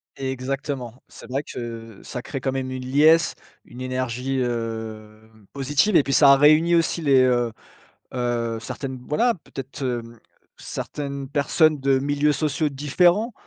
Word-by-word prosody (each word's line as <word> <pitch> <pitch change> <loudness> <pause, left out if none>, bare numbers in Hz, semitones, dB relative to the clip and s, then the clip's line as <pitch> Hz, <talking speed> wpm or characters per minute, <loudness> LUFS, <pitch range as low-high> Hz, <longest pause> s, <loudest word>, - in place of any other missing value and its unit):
Exactement. 135 -1 -4
C'est - - -14
vrai 135 +3 -2
que 115 -4 -8
ça 125 - -6
crée 135 - -5
quand 135 - -1
même 130 -1 -3
une 130 0 -5
liesse, 155 +6 +4 0.3
une 125 +1 -11
énergie, 130 +1 -2
heu, 110 -2 -5 0.2
positive 145 +8 +1
et - - +7
puis 135 - -2
ça 140 +1 +7
réunit 155 +4 +5
aussi 165 0 +1
les, 135 -4 +4
heu 120 -2 +2 0.6
heu, 120 -2 -1
certaines, 130 +3 -6
voilà, 235 +11 +2
peut-être, 135 +1 -8
hem, 120 -2 -4 0.4
certaines 140 -2 -5
personnes 145 +1 +2
de 135 0 +2
milieux 145 +2 +1
sociaux 150 0 0
différents 175 - +2
135 Hz, 145 wpm, -23 LUFS, 120-145 Hz, 0.6 s, et